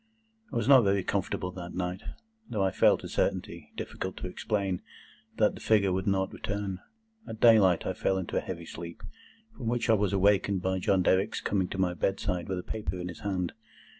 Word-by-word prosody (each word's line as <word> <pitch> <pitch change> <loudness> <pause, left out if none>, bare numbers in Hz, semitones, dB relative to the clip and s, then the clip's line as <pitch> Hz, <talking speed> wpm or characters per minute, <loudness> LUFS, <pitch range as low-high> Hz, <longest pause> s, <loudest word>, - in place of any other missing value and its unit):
I - - -6
was 115 - 0
not 135 -3 +8
very 100 -1 +2
comfortable 90 -1 -2
that 90 -1 -8
night, 90 +1 -3 0.5
though 105 -4 0
I 95 - +2
felt - - +4
a - - -5
certainty, - - -2
difficult 95 0 -5
to - - -4
explain, 95 -1 -2 0.6
that - - +3
the - - -11
figure 100 -4 +3
would 95 +2 -2
not 95 -1 +1
return. 100 -2 -3 0.5
At 110 - -7
daylight 105 -7 +6
I - - -1
fell 95 - 0
into 95 -2 -4
a - - +2
heavy 85 -2 -6
sleep, 85 +1 -8 0.5
from 120 - -6
which 120 0 +1
I - - +6
was 105 -3 +2
awakened 100 -1 +2
by 95 0 0
John 95 0 +2
Derrick's 95 +2 +2
coming 95 -3 0
to 95 - -6
my 90 -2 +1
bedside 90 +1 -1
with 95 - -1
a 90 - -4
paper 105 -4 -4
in 90 0 -4
his 85 - -8
hand. 95 -4 -2
95 Hz, 200 wpm, -29 LUFS, 90-100 Hz, 0.6 s, not